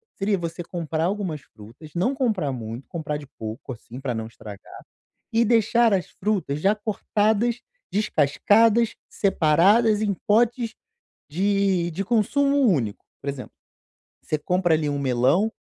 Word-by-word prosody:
seria 200 +1 0
você 170 0 -5
comprar 165 -2 -3
algumas 185 -7 -2
frutas, 115 +9 -15
não 200 +11 +1
comprar 215 - 0
muito, 115 0 -7
comprar 150 -3 -4
de 145 -1 -11
pouco 110 +4 -6
assim 120 +2 -11
para 130 -3 -2
não 110 0 -3
estragar, 105 -3 -11 0.5
e 230 +1 +3
deixar 230 0 +3
as 185 - 0
frutas 185 -8 -2
já 195 +5 +3
cortadas, 215 +2 0 0.3
descascadas, 215 +5 +3
separadas 200 +5 +3
em 205 -2 +1
potes 230 +2 +2 0.6
de 190 0 +1
de 185 +5 -3
consumo 275 +6 +2
único. 115 - -2 0.2
Por 140 - -4
exemplo, 135 -2 -7 0.7
você 155 - -1
compra 180 +2 +1
ali 155 -1 0
um 145 - -2
melão 135 - +2
180 Hz, 140 wpm, -24 LUFS, 145-215 Hz, 0.7 s, e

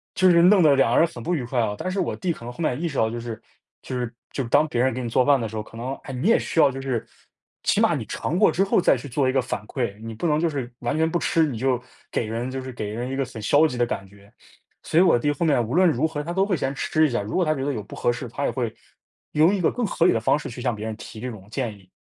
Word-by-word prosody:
就 185 +1 +5
是 170 -1 +6
弄 190 +1 +6
得 150 -4 +6
2 125 -3 +3
人 165 - +5
很 120 -8 -10
不 180 - -1
愉 140 -7 -1
快 125 0 -1
啊。 105 -3 +1
但 185 - -3
是 190 +1 -2
我 175 - 0
弟 180 -2 -1
可 115 - -13
能 120 - -6
后 - - -19
面 130 -6 0
也 170 - -3
意 - - +1
识 140 - -5
到， 110 - +2
就 120 +1 -5
是 115 -2 -6 0.4
就 130 - -5
是 120 -1 -3 0.2
就 135 - -2
是 115 - -7
当 155 - +4
别 120 -4 -1
人 130 - +2
给 130 - -4
你 120 - -3
做 125 +2 +3
饭 140 -2 +4
的 115 - -2
时 110 - -9
候， 105 - -3
可 115 - -13
能， 130 +3 -4
哎， 135 - -7
你 130 +10 -1
也 230 - +6
需 165 - -2
要 145 - +7
就 135 0 -6
是 130 -4 -2 0.6
起 - - +2
码 - - +3
你 - - -4
尝 170 - -3
过 210 - +5
之 195 - +2
后 195 - +2
再 175 - +4
去 130 +3 -7
做 130 +2 +1
一 - - +3
个 135 -1 +2
反 105 -3 -4
馈， 115 -6 -3
你 115 0 -6
不 170 +10 -2
能 150 0 +2
就 170 - +2
是 130 -5 -4
完 120 +4 -2
全 160 +1 +2
不 175 - 0
吃， 165 -1 +2
你 130 -7 -4
就 125 0 0 0.3
给 - - -1
人 115 +4 -3
就 130 - -4
是 130 0 -7
给 105 -3 -4
人 120 +4 -4
一 135 - -3
个 135 - 0
很 115 -3 -9
消 145 +9 +4
极 140 - -1
的 120 - +3
感 100 -4 -4
觉。 100 +1 -19 0.5
所 165 - +2
以 - - +7
我 180 - +5
弟 145 +5 +1
后 155 +4 -1
面 130 -7 +2
无 120 - -5
论 185 +1 +5
如 155 +2 +1
何 150 -2 -4
他 170 +3 -5
都 190 +1 +2
会 195 -3 0
先 135 -1 -2
吃 155 +3 +2
一 - - -5
下， 120 -3 0
如 105 - -5
果 185 - +3
他 155 0 +1
觉 135 - -3
得 145 - 0
有 110 - -3
不 100 - -11
合 - - +1
适， 120 +1 -5
他 140 +5 -3
也 - - +1
会 120 -4 -2 0.6
用 160 +7 +4
一 - - -2
个 165 - +3
更 245 - -3
合 170 - +1
理 - - +6
的 115 - +1
方 120 - +2
式 - - -7
去 120 +1 -8
向 125 -2 0
别 105 +1 -6
人 110 -1 -4
提 110 - -10
这 125 -1 -4
种 100 -3 -12
建 120 -3 -3
议。 95 -2 -20
130 Hz, 360 characters per minute, -24 LUFS, 115-155 Hz, 0.6 s, 要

